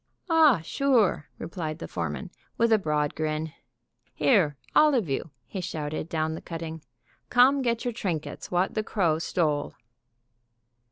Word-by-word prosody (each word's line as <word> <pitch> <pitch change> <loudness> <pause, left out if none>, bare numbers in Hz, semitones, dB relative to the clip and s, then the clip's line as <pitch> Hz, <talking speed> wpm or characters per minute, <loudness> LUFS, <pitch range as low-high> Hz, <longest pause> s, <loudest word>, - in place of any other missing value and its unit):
"Ah, 305 - +6
sure!" 230 - +2
replied 160 -3 -5
the - - -7
foreman, - - -4 0.3
with 230 -1 +3
a 220 - +5
broad 150 -4 0
grin. 155 0 -2 0.6
"Here, 170 - +3 0.2
all 300 -2 +6
of 225 -9 +1
you," 135 +4 -2 0.2
he 190 - -5
shouted 155 -1 -4
down 160 -1 -1
the 160 - -6
cutting, 165 -1 -6 0.5
"come 260 +3 +5
get 235 -1 -1
your 245 - -1
trinkets 175 -8 -4
what 180 +2 +1
the 215 - 0
crow 175 -7 +1
stole!" 155 -3 -1
170 Hz, 145 wpm, -27 LUFS, 155-230 Hz, 0.6 s, Ah